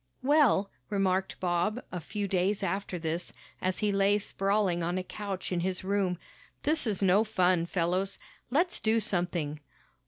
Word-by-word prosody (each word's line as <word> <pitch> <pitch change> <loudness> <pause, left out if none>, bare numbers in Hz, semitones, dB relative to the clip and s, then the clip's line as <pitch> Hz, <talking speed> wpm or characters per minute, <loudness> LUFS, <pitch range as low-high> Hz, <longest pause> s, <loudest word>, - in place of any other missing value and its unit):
"Well," 265 -8 +4 0.2
remarked 190 -2 0
Bob 180 +5 0
a 180 - -3
few 200 +5 -4
days 195 +2 +1
after 190 0 -2
this, 165 +1 -3 0.3
as 185 0 0
he 210 -1 +1
lay 200 +1 +3
sprawling 195 -3 0
on 175 +2 -1
a 185 - -1
couch 195 -1 -5
in 180 - 0
his 185 +1 -2
room, 190 -2 0 0.5
"this 305 -3 +2
is 205 -2 0
no 195 +3 +5
fun, 185 -5 +2
fellows. 185 +3 0 0.3
Let's 340 +8 +2
do 225 +1 +2
something." 175 -7 -1
190 Hz, 155 wpm, -29 LUFS, 180-205 Hz, 0.5 s, no